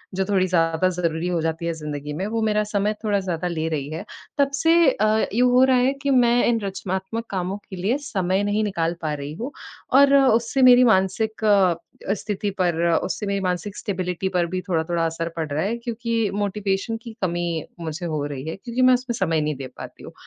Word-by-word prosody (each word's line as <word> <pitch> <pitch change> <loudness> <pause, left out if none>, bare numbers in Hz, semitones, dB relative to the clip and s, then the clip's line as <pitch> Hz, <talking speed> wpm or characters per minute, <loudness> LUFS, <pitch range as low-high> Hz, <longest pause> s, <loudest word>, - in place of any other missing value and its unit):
जो 190 0 0
थोड़ी 190 -2 +1
ज़्यादा 165 0 +2
ज़रूरी 170 -2 -2
हो 175 -1 0
जाती 165 +1 -2
हैं 170 - -1
ज़िंदगी 150 -2 -6
में, 185 +6 -3
वो 225 +1 -2
मेरा 210 -1 +2
समय 210 0 0
थोड़ा 205 -2 +1
ज़्यादा 180 -2 -3
ले 160 -2 -2
रही 145 -3 -3
हैं। 165 +6 -5 0.3
तब 280 -1 +2
से 325 +4 +3 0.2
अ, 215 -1 +2
यूँ 250 +3 +4
हो 250 +1 +6
रहा 260 -1 +4
है 255 +2 +3
कि 280 - -1
मैं 245 -2 +4
इन 235 -1 +2
रचनात्मक 195 +3 -4
कामों 190 0 -2
के 190 - -7
लिए 200 +9 0
समय 190 -7 -1
नहीं 205 +1 0
निकाल 170 -5 -1
पा 155 -2 -2
रही 145 0 -5
हूँ। 235 - -5 0.4
और 280 +1 +6
उससे 260 -1 +3
मेरी 250 -1 +8
मानसिक 220 0 +1
अ, 190 -2 +1
स्थिति 205 0 -3
पर 175 -2 +2 0.3
उससे 210 - -3
मेरी 200 0 -1
मानसिक 185 +2 -3
स्टेबिलिटी 185 -2 -3
पर 180 -2 +1
भी 185 +2 -3
थोड़ा-थोड़ा 165 0 0
असर 165 +1 -2
पड़ 160 -2 -2
रहा 150 +2 0
है। 220 +4 -1
क्योंकि 230 -2 -2
मोटिवेशन 205 +2 -1
की 230 -2 -8
कमी 170 -3 -1 0.2
मुझे 165 +1 -5
हो 155 -3 -2
रही 140 0 -6
है, - - -4
क्योंकि 235 +4 -4
मैं 255 0 +6
उसमें 250 -1 -1
समय 165 -6 +1
नहीं 150 0 -1
दे 135 0 -7
पाती - - -10
हूँ। - - -10
190 Hz, 210 wpm, -23 LUFS, 170-225 Hz, 0.4 s, मेरी